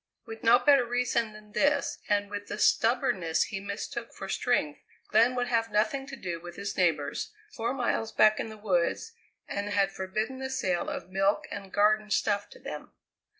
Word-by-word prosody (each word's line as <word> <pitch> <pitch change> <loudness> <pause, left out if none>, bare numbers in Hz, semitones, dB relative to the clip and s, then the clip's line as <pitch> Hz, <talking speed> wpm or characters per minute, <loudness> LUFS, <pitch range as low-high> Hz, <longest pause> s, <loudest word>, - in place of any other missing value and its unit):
With 225 0 -9
no 230 +1 +7
better 280 -2 +5
reason 240 -2 0
than 210 0 -14
this, 285 +4 +1
and 205 0 +1
with 205 0 -5
the 205 - -5
stubbornness 200 -9 +2
he 195 - -5
mistook 200 +4 -6
for 195 - -6
strength, 195 -9 0 0.3
Glenn 235 +4 +4
would 245 -1 0
have 230 -2 0
nothing 270 +6 0
to 275 - -7
do 175 -8 -5
with 175 0 -9
his 200 0 -4
neighbours, 160 -6 0 0.2
four 230 +1 -2
miles 240 -3 -1
back 215 -1 +5
in - - -3
the 220 - -9
woods, 205 - 0 0.4
and 200 +1 -3
had 200 -1 +2
forbidden 215 +7 -3
the 265 0 -4
sale 185 -9 -1
of 180 - -6
milk 195 +2 +1
and 195 -2 -7
garden 215 +1 +3
stuff 205 0 +1
to - - -14
them. - - -8
215 Hz, 185 wpm, -29 LUFS, 195-240 Hz, 0.4 s, no